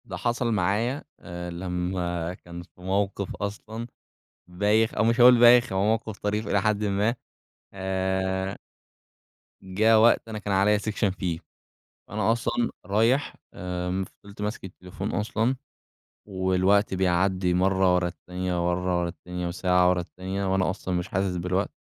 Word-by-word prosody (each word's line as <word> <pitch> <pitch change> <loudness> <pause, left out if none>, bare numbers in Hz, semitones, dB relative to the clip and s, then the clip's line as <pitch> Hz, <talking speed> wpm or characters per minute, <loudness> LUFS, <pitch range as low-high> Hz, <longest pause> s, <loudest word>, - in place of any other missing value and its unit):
ده - - -6
حصل 120 +1 -1
معايا، 110 - 0 0.2
آآ، 90 -1 -7
لما 90 -1 -3
كان 85 -1 -10
في 90 +1 -22
موقف 100 +1 -1
أصلًا 110 +3 -5 0.6
بايخ 105 +5 +1
أو - - +1
مش 115 +2 +2
هاقول 125 0 +8
بايخ، 120 -1 +6
هو 95 +1 +1
موقف 110 -1 -1
طريف 105 +2 -2
إلى 100 - +2
حدٍ 105 -1 +1
ما 105 +3 +1 0.6
آآ 95 0 -1 1.1
جا 105 +4 +3
وقت 115 +1 +4
أنا 110 -1 -5
كان 105 -1 -3
عليَّا 100 +2 +4
section 105 0 -1
فيه، 85 -4 -2 0.7
أنا 110 +2 +1
أصلًا 115 0 -1 0.2
رايح 115 +8 +1 0.2
آآ، 90 +1 -3 0.2
فضلت 100 0 -10
ماسك 105 0 -4
التليفون 95 +2 -7
أصلًا 110 +5 0 0.7
والوقت 95 +1 +2
بيعدي 90 0 +1
مرة 95 0 +3
ورا 90 -1 +1
التانية 90 0 -3
ورا - - +1
مرة 90 -1 0
ورا 85 - -1
التانية 90 0 -6
وساعة 90 0 +2
ورا 90 -1 +1
التانية 95 +2 -4
وأنا 95 -2 +2
أصلًا 95 -1 -4
مش 90 0 -2
حاسس 95 -1 -1
بالوقت، 90 +2 -1
95 Hz, 145 wpm, -26 LUFS, 90-105 Hz, 1.1 s, هاقول